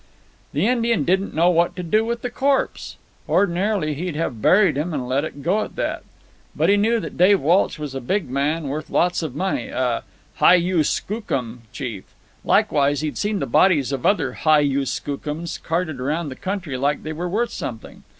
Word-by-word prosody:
"The 150 +7 0
Indian 235 - +2
didn't 190 +3 0
know 170 +3 +4
what 170 +1 +2
to 180 - -5
do 215 +6 +2
with 235 +1 -3
the 245 - -3
corpse. 275 0 -1 0.3
Ordinarily 185 -3 +1
he'd 170 +2 -4
have 140 -8 -3
buried 185 - +4
him 155 +3 -2
and 130 -3 -3
let 135 +3 0
it 145 -3 -7
go 195 +6 +2
at - - -9
that. - - -2 0.5
But - - +2
he 200 - +6
knew 225 +3 +2
that - - -7
Dave 190 +2 +6
Walsh 170 +6 +2
was 150 -3 -6
a 135 - -4
big 190 +8 -1
man, 145 +4 -1
worth 150 +3 -4
lots 180 +1 +1
of 155 -6 -5
money, 190 +5 -1
a 125 -2 -1 0.4
hi - - +7
yu 175 -2 +2
skookum 135 - -3
chief. 120 -6 -7 0.3
Likewise 145 0 +2
he'd 155 -1 -3
seen 210 0 0
the - - -2
bodies 150 -8 +3
of 135 -3 -3
other 205 - +1
hi 155 -1 +3
yu 140 -1 +1
skookums 150 +3 -4
carted 160 -4 -2
around 150 +4 -2
the 130 - -7
country 185 -7 -4
like 140 +3 0
they 155 - -4
were 175 +3 -4
worth 230 +6 0
something. 115 -3 -7
165 Hz, 195 wpm, -22 LUFS, 140-190 Hz, 0.5 s, hi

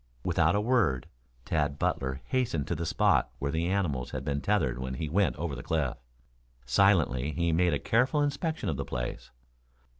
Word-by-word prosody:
Without - - +2
a 105 - +2
word, 105 - +2 0.4
Tad 75 -2 0
Butler 65 -1 -1
hastened 120 - 0
to - - +1
the 85 0 -3
spot - - +3
where 70 +2 -2
the 80 +2 0
animals 85 -10 -1
had 65 0 -5
been 70 -1 -1
tethered 65 -13 +1
when 65 0 -4
he 80 +4 -3
went 85 -4 +2
over 75 -2 -3
the 65 - -6
cliff. 75 -5 -1 0.7
Silently 75 -3 +3
he 85 +2 0
made 85 +1 +3
a - - +1
careful 130 +6 +2
inspection 160 +3 -2
of 75 - -1
the 70 - -2
place. - - -5
80 Hz, 180 wpm, -29 LUFS, 65-100 Hz, 0.7 s, spot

